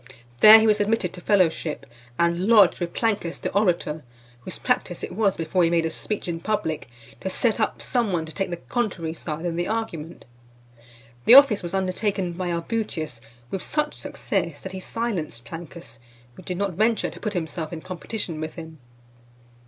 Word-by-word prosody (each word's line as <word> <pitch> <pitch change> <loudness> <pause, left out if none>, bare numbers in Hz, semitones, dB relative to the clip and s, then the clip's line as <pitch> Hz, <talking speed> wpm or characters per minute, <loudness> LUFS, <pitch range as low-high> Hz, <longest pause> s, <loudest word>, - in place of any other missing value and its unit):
There 215 +1 +11
he 220 - +2
was 215 -1 +4
admitted 205 -3 0
to 180 - -10
fellowship, 170 -5 +1 0.3
and 170 +2 +1
lodged, 210 -5 +6
with 175 -1 -3
Plancus 205 -7 -1
the - - -4
orator, 175 -6 +1 0.4
whose 125 - -8
practice - - -1
it - - -4
was, 200 0 +1
before 165 +2 +1
he 165 - +4
made 165 -1 +2
a 165 - -1
speech 210 +4 -4
in 165 -1 -3
public, 165 - -2 0.3
to 190 - -3
set 230 +4 +1
up 215 - -1
some 235 -5 0
one 165 -3 -1
to 160 - -10
take 195 - -2
the 175 - -4
contrary 170 - -2
side 160 0 -5
in 170 -1 -2
the 175 - -1
argument. 175 -8 -4 1.0
The 240 - +9
office 275 -7 +8
was 175 +1 -4
undertaken 190 -1 -1
by 180 +1 -3
Albutius 170 - -3 0.3
with 190 - -3
such 300 -1 -1
success, 190 - -3
that 190 - -7
he 190 - -6
silenced 185 - -3
Plancus, 165 -7 -10 0.3
who - - -13
did 180 0 -5
not 200 -1 -1
venture 220 +5 +1
to - - -11
put 210 -2 -3
himself 160 -2 -4
in 165 -2 -6
competition 180 -2 -5
with 155 0 -5
him. 160 -2 -10
180 Hz, 185 wpm, -24 LUFS, 165-210 Hz, 1.0 s, There